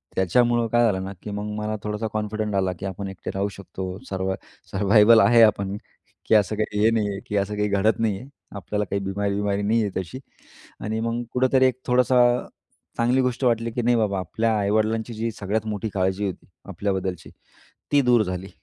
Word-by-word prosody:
त्याच्यामुळं 120 Hz, +5 st, +2 dB
काय 120 Hz, +1 st, +3 dB
झालं 95 Hz, -4 st, 0 dB
ना? 95 Hz, -, -6 dB
की 105 Hz, -, -7 dB
मग 105 Hz, +1 st, -4 dB
मला 105 Hz, 0 st, -2 dB
थोडासा 105 Hz, +1 st, -2 dB
कॉन्फिडंट 110 Hz, -1 st, -2 dB
आला 95 Hz, -1 st, +1 dB
की -, -, -5 dB
आपण 95 Hz, +1 st, -5 dB
एकटे 95 Hz, -2 st, -7 dB
राहू 100 Hz, +1 st, 0 dB
शकतो 95 Hz, -1 st, -6 dB
सरवा 95 Hz, 0 st, -2 dB, 0.4 s
सरवायवल 105 Hz, +3 st, +5 dB
आहे. 120 Hz, -1 st, +6 dB
आपण 100 Hz, -2 st, +2 dB, 0.5 s
की -, -, +4 dB
असं 105 Hz, 0 st, +3 dB
काही, 105 Hz, -1 st, -2 dB
हे 110 Hz, -, +5 dB
नाही 110 Hz, -2 st, +1 dB
आहे, 100 Hz, -1 st, -4 dB
की 105 Hz, -, -1 dB
असं 100 Hz, +1 st, -1 dB
काही 105 Hz, 0 st, 0 dB
घडत 100 Hz, +2 st, +2 dB
नाही 110 Hz, -4 st, 0 dB
आहे. 130 Hz, -, -12 dB, 0.3 s
आपल्याला 105 Hz, +2 st, -2 dB
काही 100 Hz, +1 st, -2 dB
बिमारी-विमारी 100 Hz, +1 st, -1 dB
नाही 110 Hz, +3 st, +2 dB
आहे 100 Hz, -, -2 dB
तशी. 95 Hz, +8 st, -9 dB, 0.6 s
आणि 110 Hz, +1 st, -2 dB
मग 115 Hz, +1 st, -2 dB
कुठेतरी 130 Hz, +1 st, +3 dB
एक 130 Hz, -1 st, -2 dB
थोडीशी 125 Hz, 0 st, +3 dB, 0.8 s
चांगली 120 Hz, +3 st, +2 dB
गोष्ट 125 Hz, +1 st, -1 dB
वाटली 115 Hz, -1 st, +1 dB
की 120 Hz, +2 st, -2 dB
नाही 120 Hz, +1 st, +3 dB
बाबा, 100 Hz, -3 st, 0 dB
आपल्या 110 Hz, +5 st, 0 dB
आई-वडिलांची 110 Hz, +3 st, 0 dB
जी 115 Hz, +1 st, -2 dB
सगळ्यात 105 Hz, +2 st, -2 dB
मोठी 105 Hz, 0 st, -3 dB
काळजी 95 Hz, +1 st, 0 dB
होती 95 Hz, -, -7 dB, 0.2 s
आपल्याबद्दलची 95 Hz, -3 st, -3 dB, 0.6 s
ती 145 Hz, -, +5 dB
दूर 120 Hz, -3 st, +4 dB
झाली. 95 Hz, 0 st, -5 dB
105 Hz, 190 wpm, -24 LUFS, 100-115 Hz, 0.8 s, आहे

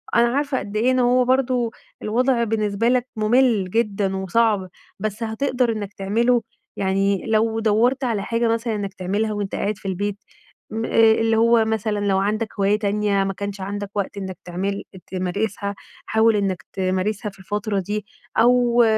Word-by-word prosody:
أنا 235 Hz, 0 st, +5 dB
عارفة 285 Hz, -2 st, 0 dB
قد 205 Hz, +1 st, -5 dB
ايه 240 Hz, +4 st, +3 dB
إن 255 Hz, -, +2 dB
هو 250 Hz, +1 st, +4 dB
برضو 250 Hz, -2 st, +1 dB, 0.3 s
الوضع 240 Hz, +2 st, +1 dB
بالنسبة 215 Hz, 0 st, 0 dB
لك 250 Hz, 0 st, +1 dB
ممل 215 Hz, -3 st, +3 dB
جدًا، 205 Hz, -4 st, 0 dB
وصعب، 190 Hz, 0 st, +1 dB, 0.3 s
بس 215 Hz, +1 st, -3 dB
هتقدر 245 Hz, +2 st, 0 dB
إنك 210 Hz, -2 st, -5 dB
تعمله 230 Hz, +5 st, +1 dB, 0.4 s
يعني 195 Hz, 0 st, +1 dB
لو 225 Hz, 0 st, +1 dB
دوَّرت 230 Hz, +5 st, +2 dB
على 225 Hz, -5 st, 0 dB
حاجة 230 Hz, 0 st, 0 dB
مثلًا 230 Hz, 0 st, 0 dB
إنك 200 Hz, -1 st, -4 dB
تعملها 205 Hz, +3 st, -1 dB
وأنت 205 Hz, -2 st, -3 dB
قاعد 210 Hz, 0 st, -1 dB
في 195 Hz, -, -8 dB
البيت، 200 Hz, +2 st, -2 dB, 0.5 s
م 225 Hz, +1 st, -2 dB
اللي 225 Hz, 0 st, +4 dB
هو 230 Hz, 0 st, +4 dB
مثلًا 220 Hz, -1 st, -1 dB
لو 195 Hz, -1 st, +2 dB
عندك 215 Hz, +3 st, 0 dB
هواية 205 Hz, +2 st, +3 dB
تانية 205 Hz, -1 st, +1 dB
ما 195 Hz, -, -2 dB
كانش 200 Hz, 0 st, -5 dB
عندك 205 Hz, +1 st, -4 dB
وقت 200 Hz, 0 st, -2 dB
إنك 190 Hz, -3 st, -5 dB
تعمل 195 Hz, +3 st, -3 dB, 0.2 s
تمارسها 200 Hz, +2 st, -2 dB, 0.3 s
حاول 220 Hz, 0 st, +3 dB
إنك 190 Hz, -6 st, -1 dB
تمارسها 190 Hz, +3 st, -1 dB
في 195 Hz, -, -21 dB
الفترة 205 Hz, +1 st, -2 dB
دي، 205 Hz, +3 st, -3 dB, 0.3 s
أو 240 Hz, 0 st, +5 dB
215 Hz, 160 wpm, -22 LUFS, 200-230 Hz, 0.5 s, أنا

